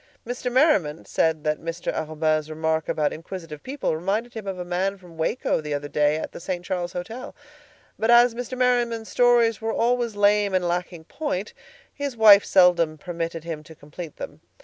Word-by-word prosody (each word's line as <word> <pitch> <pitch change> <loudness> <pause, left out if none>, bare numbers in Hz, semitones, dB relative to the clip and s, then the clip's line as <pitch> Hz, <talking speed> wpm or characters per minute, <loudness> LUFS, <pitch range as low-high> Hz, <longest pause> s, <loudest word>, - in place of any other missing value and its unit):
Mr. 245 +1 -3
Merriman 240 - +2
said 160 -2 0
that 150 0 -1
Mr. 165 +1 -4
Arobin's 155 0 -1
remark 160 0 -1
about 150 -1 0
inquisitive 165 -2 -8
people 265 - -2
reminded 205 +8 -2
him 220 -3 -7
of 190 -1 -3
a 180 - -5
man 185 +3 -1
from 180 -3 -16
Waco 160 +2 0
the 150 -1 -3
other 145 0 -4
day 150 0 +2
at - - -5
the - - -9
St. 175 0 -4
Charles 175 -2 -3
Hotel—but 225 +2 -8
as 240 0 +6
Mr. 245 +2 -5
Merriman's 240 -3 +1
stories 240 -3 +3
were 225 0 -1
always 235 -1 0
lame 205 -1 +3
and 180 -1 +1
lacking 175 -1 -3
point, 210 - -4 0.4
his 285 -4 -4
wife 210 -2 +8
seldom 175 -4 +4
permitted 165 0 -5
him 165 -2 -5
to 160 +1 -14
complete 150 +2 -9
them. - - -8
180 Hz, 175 wpm, -24 LUFS, 160-230 Hz, 0.4 s, wife